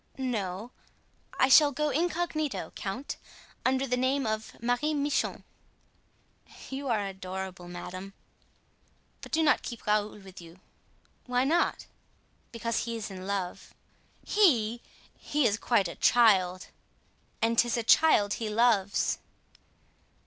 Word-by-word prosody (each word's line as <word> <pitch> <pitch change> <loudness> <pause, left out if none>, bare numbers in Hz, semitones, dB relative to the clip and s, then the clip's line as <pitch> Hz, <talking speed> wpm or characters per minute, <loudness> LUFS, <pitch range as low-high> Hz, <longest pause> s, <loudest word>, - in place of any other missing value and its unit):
"No, 220 -4 -3 0.7
I 260 - +4
shall 290 +2 +7
go 300 +2 -1
incognito, 320 -1 -1
count, 235 +8 -5 0.5
under 260 +1 +1
the 250 -1 0
name 260 +2 0
of 215 0 -4
Marie 245 +6 0
Michon." 290 0 -1 1.3
"You 275 +1 -4
are 215 -5 0
adorable, 190 -1 -6
madame." 185 +2 -8 1.1
"But - - -10
do 320 0 +2
not 295 - +3
keep 235 -3 -8
Raoul 210 0 0
with 190 -3 -12
you." 170 +1 -14 0.7
"Why 250 0 +1
not?" 330 +6 +1 0.7
"Because 230 0 -2
he 230 -1 -4
is 220 -2 -5
in 185 0 -8
love." 195 -3 -4 0.5
"He! 240 - +3 0.4
he 295 -2 0
is 215 -1 +2
quite 220 -7 +2
a 170 - -6
child!" 190 -6 +3 0.7
"And 230 0 +2
'tis 240 0 +2
a 235 - -1
child 220 -6 +5
he 225 -2 -3
loves." 210 -3 +2
230 Hz, 125 wpm, -29 LUFS, 195-265 Hz, 1.3 s, shall